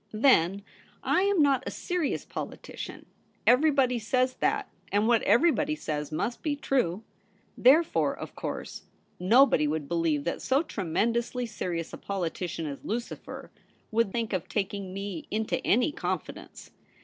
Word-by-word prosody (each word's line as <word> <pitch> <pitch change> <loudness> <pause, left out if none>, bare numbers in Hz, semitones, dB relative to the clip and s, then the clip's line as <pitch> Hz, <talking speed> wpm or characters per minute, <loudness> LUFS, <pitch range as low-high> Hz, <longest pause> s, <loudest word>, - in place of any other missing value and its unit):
Then 200 -5 +3 0.4
I - - +2
am 395 -5 +3
not 275 -3 +3
a - - 0
serious 355 -5 -2
politician; - - -7 0.4
everybody 260 -2 +4
says 255 +3 +1
that, - - 0 0.2
and 205 +2 +2
what 235 -2 +4
everybody 305 +1 +3
says 150 - -4
must 230 +10 -2
be 300 -2 -1
true. 230 - 0 0.5
Therefore, 305 +7 +4
of - - -8
course, - - -5 0.4
nobody 200 - +5
would 150 -1 -2
believe 165 -3 0
that 170 - -3
so 270 +4 +2
tremend 210 - 0
ously 245 +1 -2
serious 175 -7 -4
a - - -7
politician 175 -3 -3
as 140 -2 -6
Lucifer 235 +3 -5 0.4
would 225 -2 +2
think 230 -1 -2
of 185 -3 -2
taking 200 -2 -2
me 195 -3 -5
into 220 +1 -1
any 250 +7 +3
confidence. - - -5
225 Hz, 140 wpm, -28 LUFS, 180-265 Hz, 0.5 s, nobody